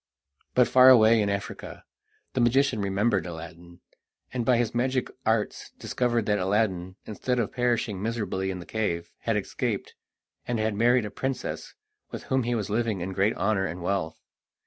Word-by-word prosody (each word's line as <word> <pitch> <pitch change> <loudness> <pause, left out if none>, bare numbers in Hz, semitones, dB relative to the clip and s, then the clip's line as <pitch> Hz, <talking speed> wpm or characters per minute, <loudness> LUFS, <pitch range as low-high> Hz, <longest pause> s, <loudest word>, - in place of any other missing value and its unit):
But 125 -2 +5
far 130 +2 +7
away 115 -3 +7
in 100 - 0
Africa 100 0 -5 0.5
the 130 - +1
magician 125 -1 +3
remembered 100 -1 +1
Aladdin, 85 +1 -10 0.5
and 125 -2 -1
by 125 0 +3
his 120 -2 0
magic 130 +1 0 0.2
arts 110 -1 0
discovered 120 -3 0
that 105 -1 +1
Aladdin, 95 -2 0
instead 125 +4 -2
of 115 -4 0
perishing 120 -5 0
miserably 105 -4 -2
in 95 - -3
the 90 - -9
cave, 85 -6 -2
had - - 0
escaped, - - -3 0.5
and 120 - 0
had 110 0 0
married 120 +2 +3
a 105 - -6
princess, 135 - -4 0.3
with - - -7
whom 130 0 +1
he 120 0 -1
was 105 -4 -2
living 110 -3 -1
in 95 +2 -4
great 100 +3 +1
honour 100 -2 +1
and 85 +2 -6
wealth. 90 -4 -1
110 Hz, 170 wpm, -26 LUFS, 95-120 Hz, 0.5 s, far